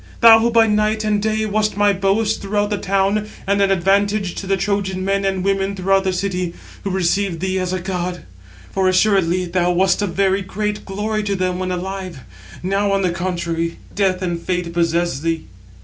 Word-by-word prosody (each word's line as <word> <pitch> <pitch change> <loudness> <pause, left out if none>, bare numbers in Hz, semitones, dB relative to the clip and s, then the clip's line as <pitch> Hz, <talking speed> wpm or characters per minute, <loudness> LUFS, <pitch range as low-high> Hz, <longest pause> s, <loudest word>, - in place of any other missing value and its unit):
Thou 225 -1 +9
who 230 +1 +2
by 230 -1 +5
night 215 0 +1
and 210 -1 +1
day 220 0 0
wast 210 -1 0
my 205 0 +4
boast 200 +3 0
throughout 205 +1 -1
the 205 - -1
town, 195 +2 0 0.2
and 200 +1 +1
an 200 - +3
advantage 195 +1 +1
to 195 - -6
the 195 0 +1
Trojan 190 -1 -1
men 195 0 0
and 190 -1 -1
women 195 0 0
throughout 195 +1 +1
the 190 - +2
city, 180 -2 -2 0.3
who 200 - -2
received 190 -1 0
thee 190 +1 -1
as 185 -1 -2
a 185 - -1
god. 180 -1 -4 0.5
For 190 -1 +2
assuredly 185 -2 +2
thou 175 0 0
wast 185 +2 +2
a 205 - 0
very 195 +2 +1
great 210 +2 -3
glory 210 +2 -2
to 200 -1 -1
them 185 -1 -1
when 185 0 -2
alive 185 -4 -5 0.4
now, 195 +2 +1
on 195 0 +1
the 180 - +1
contrary, 170 -1 -2 0.2
death 190 -2 0
and 170 -2 -2
fate 180 -2 -2
possess 170 -3 0
thee." 165 +1 -2
195 Hz, 195 wpm, -19 LUFS, 180-205 Hz, 0.5 s, Thou